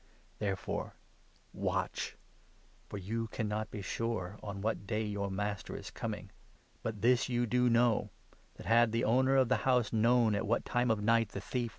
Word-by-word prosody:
Therefore 100 -3 -3 0.6
watch; - - -2 0.7
for - - -5
you 115 +4 -3
cannot 110 -1 -2
be 100 - -6
sure 105 -2 -3
on 100 -1 -5
what 105 -1 -2
day 105 0 0
42 105 - -3
your 100 -1 -2
Master 100 +1 -3
is - - -7
coming. - - -5 0.5
But 110 -2 -4
this 125 +1 +4
you 120 -1 +1
do 125 +1 +3
know, 115 -1 +3 0.5
that, - - -11
had 115 -1 +4
the 115 +1 +1
43 115 +3 +3
owner 130 +1 +3
of 130 -3 +4
the 130 - +4
house 125 -4 +2
known 115 0 +4
at 100 - -1
what 115 - +1
time 120 0 +1
of 110 -2 +1
night 115 0 +3
the - - -5
thief - - -13
21 125 -2 0
Dan. - - -8
115 Hz, 195 wpm, -33 LUFS, 105-120 Hz, 0.7 s, this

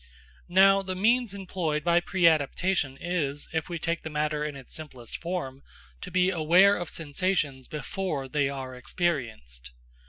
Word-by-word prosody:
Now, 195 +2 +6
the 185 -1 -4
means 230 +3 +2
employed 180 -6 -2
by 170 +1 +4
preadaptation 165 -3 +2
is, 150 -5 -2
if 160 0 -2
we 170 - -3
take 165 +1 -2
the 160 - -6
matter 150 0 -1
in 150 -1 -4
its 135 -2 -11
simplest 130 -7 -8
form, 165 -7 -4 0.4
to - - -6
be 185 +1 +2
aware 180 +4 +5
of 175 - -4
sensations 150 -4 -2
before 150 -1 -3
they 140 0 +1
are 135 -2 -6
experienced. 115 - -3
160 Hz, 150 wpm, -27 LUFS, 140-185 Hz, 0.4 s, Now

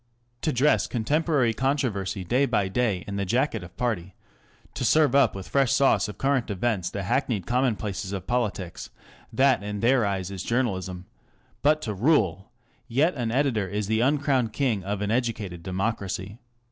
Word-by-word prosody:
To 155 - 0
dress 140 +4 +3
contemporary 140 +1 +1
controversy 110 -8 -1
day 125 +9 +2
by 105 -6 +1
day 100 -3 0
in 100 0 -5
the 100 - 0
jacket 115 +1 0
of 90 - -13
party, 95 -7 -2 0.6
to - - -4
serve 155 -4 +4
up 135 -8 +4
with 95 -1 -7
fresh 135 -3 +2
sauce 115 -8 +3
of 105 - -8
current 135 -3 0
events 100 -2 -1
the 100 - -4
hackneyed 115 -2 0
commonplaces 110 -6 -1
of 95 -2 -4
politics 105 -7 -2
ŌĆö - - -26
that 130 -5 +3
in 105 0 -4
their 120 +2 +3
eyes 100 -2 -2
is 95 -2 -5
journalism; 95 -7 -2 0.6
but 155 +1 +3
to 110 - -2
rule! 100 - +1
ŌĆö 120 -1 -40
Yet 145 +9 +2
an 120 -4 -2
editor 120 -5 +1
is 105 +2 -2
the 110 +2 0
uncrowned 135 -3 +2
king 115 -8 0
of 100 +1 -3
an 105 - -1
educated 110 -7 -2
democracy. 95 +2 -3
110 Hz, 170 wpm, -26 LUFS, 100-130 Hz, 0.6 s, serve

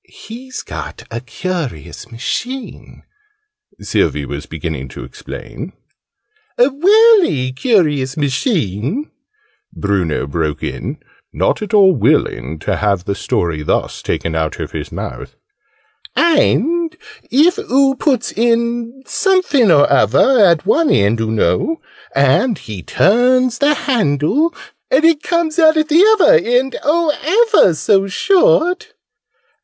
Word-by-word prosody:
"He's 255 +3 -10
got - - -8
a - - -5
curious 140 - -6
machine," 245 - -6 0.8
Sylvie - - -1
was - - -7
beginning - - -6
to - - -10
explain. - - -9 0.8
"A 250 +3 +3
welly 375 - +4
curious 145 - 0
machine," 145 - -2 0.6
Bruno 95 -8 -2
broke 75 +1 -3
in, - - -5 0.3
not - - -1
at 210 0 -2
all 195 -2 +6
willing 100 - 0
to - - -2
have 100 -4 -1
the 100 - -2
story 85 -5 -2
thus 75 - -2
taken 85 - -3
out 80 -1 -3
of - - -5
his - - -7
mouth, - - -7 0.8
"and 330 +2 +1 0.3
if 315 +8 +3
oo 270 +1 +2
puts 260 -3 -1
in 235 +2 -1
some 380 -1 +1
finoruvver 170 - +3
at 165 -3 0
one 325 0 +2
end, 105 +3 +2
oo 110 - -2
know 320 - 0 0.4
and 250 -5 +2
he 105 -5 -9
turns 245 - +2
the 295 +1 +3
handle 240 - 0 0.4
and 410 -10 +3
it 325 -3 +3
comes 335 -1 -1
out 315 -1 +5
at 310 0 0
the 320 +3 +4 0.2
uvver 170 - +4
end, 250 +3 0
oh, 315 +2 +1 0.4
ever 185 - +5
so 195 +4 +1
short!" 395 - +1
235 Hz, 120 wpm, -16 LUFS, -, 0.8 s, all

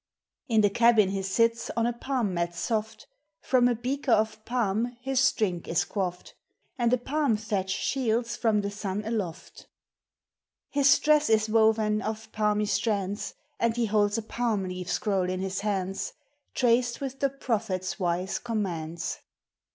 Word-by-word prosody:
In 220 -3 +4
the 205 -1 +3
cabin 230 -3 +5
he 195 0 -2
sits 230 +4 +1
on 230 - +2
a 240 - +1
palm 235 -4 -2
mat 170 0 -2
soft, 220 +2 -2 0.3
From 250 -2 +3
a 245 - +2
beaker 255 +3 -2
of 215 0 +1
palm 235 0 -1
his 265 +1 +2
drink 180 -6 -1
is 165 - +1
quaffed, 180 -3 -4 0.4
And 240 -3 +1
a 250 - +4
palm 270 -1 0
thatch 205 -3 -2
shields 235 +2 0
from 220 -3 +2
the 200 0 -3
sun 205 0 -4
aloft! 205 -7 -5 1.0
His 280 0 +5
dress 300 -2 +3
is 220 0 +3
woven 220 -1 +3
of 220 0 -5
palmy 210 -1 +1
strands, 205 -2 -1 0.2
And 230 -1 +1
he 240 - +2
holds 205 -1 +2
a 225 - -3
palm 225 -3 -1
leaf 180 -1 -5
scroll 195 -4 0
in 185 0 -2
his 190 0 -2
hands, 195 -2 -2 0.4
Traced 240 -1 +2
with 270 -1 -5
the 275 - +2
Prophet's 220 -8 -2
wise 180 +1 -1
commands 175 -8 -3
220 Hz, 155 wpm, -27 LUFS, 195-240 Hz, 1.0 s, cabin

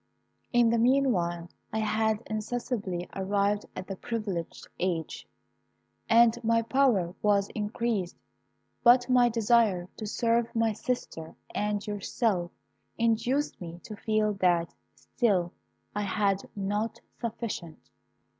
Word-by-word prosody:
"In 240 -2 +4
the 230 - +2
meanwhile, 220 -10 +2 0.2
I 220 - -2
had 220 0 +1
insensibly 215 -4 -3
arrived 200 +1 0
at 185 - -5
the 195 - -5
privileged 200 -6 -4
age, 170 -4 -2 0.8
and 235 +1 +5
my 230 0 +3
power 225 -9 +2
was 200 -1 +2
increased, 210 -3 -2 0.7
but 245 +1 +6
my 250 -1 +5
desire 220 -5 +3
to 215 - -5
serve 230 +2 0
my 225 -1 +2
sister 210 -8 -4 0.2
and 210 0 -1
yourself 205 -3 -1 0.5
induced 230 +5 0
me 170 0 -7
to 215 - -8
feel 215 0 +1
that 175 -2 +2 0.2
still 190 -8 0 0.4
I 210 - 0
had 200 -1 0
not 205 +3 -2 0.2
sufficient. 225 -8 -5
215 Hz, 115 wpm, -28 LUFS, 190-230 Hz, 0.8 s, but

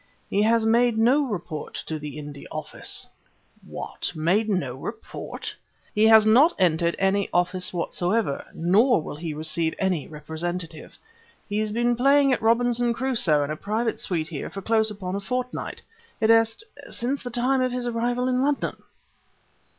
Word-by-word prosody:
"He 200 - +2
has 225 +1 +3
made 235 0 +3
no 265 +6 +3
report 175 -8 -5
to 155 -1 -4
the 150 0 -7
India 145 -1 -8
Office." 155 -1 -4 0.6
"What! - - -4
made 185 +8 +1
no 180 -11 -1
report?" 140 - -7 0.4
"He 215 +1 +4
has 220 -1 +7
not 260 +10 +5
entered 170 -1 +2
any 195 +1 +1
office 180 +1 +1
whatever, 175 0 -1
nor 200 +9 +3
will 155 - -6
he 160 -1 -5
receive 160 +1 -1
any 185 -6 -1
representative. 160 +2 -5 0.5
He's 215 +1 -1
been 240 +2 +1
playing 275 +2 +4
at - - -1
Robinson 235 +1 +2
Crusoe 225 - +2
in 145 - -3
a - - -2
private 220 +6 -2
suite 165 -3 -1
here 155 -4 -5
for 195 - -8
close 220 0 +3
upon 195 -3 -5
a - - -1
fortnight 250 +5 -4 0.4
id 220 0 +4
est 225 - +3 0.3
since 260 +4 -1
the 245 - -5
time 255 +2 +1
of 255 0 +1
his 250 0 -2
arrival 240 +1 -1
in 255 0 +1
London!" 285 +1 0
215 Hz, 160 wpm, -25 LUFS, 170-240 Hz, 0.6 s, has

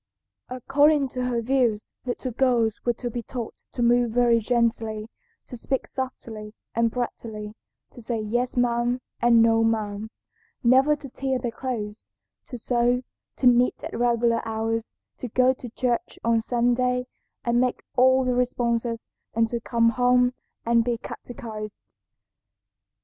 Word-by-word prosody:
"According 280 +3 +3
to 250 0 -3
her 240 -2 -1
views 240 -4 +1 0.2
little 250 +1 -3
girls 235 -3 +1
were 240 - +2
to 240 +1 -5
be 240 - -3
taught 235 0 -7
to 240 - -1
move 240 0 +4
very 235 0 +3
gently, 225 -2 0 0.4
to - - -9
speak 260 +3 -2
softly 225 -5 -6 0.2
and 230 0 +2
prettily, 220 -3 -5 0.4
to 240 - -12
say 230 0 -2
'yes 240 +4 -1
ma'am,' 240 0 +1 0.2
and 235 -1 +6
'no 225 0 +4
ma'am,' 215 -1 -1 0.5
never 265 +5 +5
to 290 -1 -10
tear 265 0 -2
their 245 -2 -3
clothes, 225 -4 -5 0.4
to 250 - -6
sew, 245 +1 +1 0.3
to - - -3
knit 245 0 +4
at - - -5
regular 235 -1 +2
hours, 225 0 -2 0.2
to 250 - -4
go 255 +3 +3
to 250 -1 -9
church 240 0 -2
on 230 -1 +3
Sunday 250 +2 +1 0.4
and 240 0 +3
make 255 -1 -1
all 260 +1 +5
the 250 - +1
responses, 235 -2 -1 0.2
and 225 0 +2
to 235 - -2
come 230 -1 +2
home 250 +1 +3 0.3
and 235 0 +4
be 240 0 -1
catechised. 225 -3 -8
240 Hz, 145 wpm, -25 LUFS, 230-250 Hz, 0.5 s, and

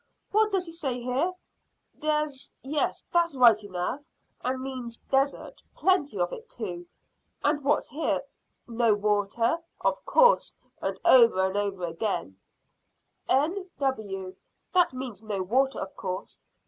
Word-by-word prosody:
What 430 +1 +3
does 380 -2 +1
he 330 - -6
say 275 -7 -3
here? 255 +9 0 0.7
`Des 300 -2 -2
' - - -47
Yes, 290 +3 0
that's 340 -3 +2
right 230 -4 +6
enough, 190 +7 -3 0.4
and 260 +1 -1
means 255 -3 -6
desert. 275 +1 0
Plenty 345 - +2
of 175 0 0
it 455 - -9
too. 175 -6 -6 0.6
And 295 0 +1
what's 275 - +1
here? 300 +5 0 0.5
`No 230 -2 +2
water.' 210 +7 +1 0.2
Of - - 0
course, - - +4 0.3
and - - -2
over 230 -7 +7
and 190 +1 -2
over 200 -3 -1
again, 165 - -3 0.9
`N.W.' 265 - -1 0.4
That 360 -1 +4
means 255 -6 -6
no 205 -4 -3
water, 265 +8 +1
of 190 - -6
course. 185 0 -5
255 Hz, 135 wpm, -27 LUFS, 205-300 Hz, 0.9 s, over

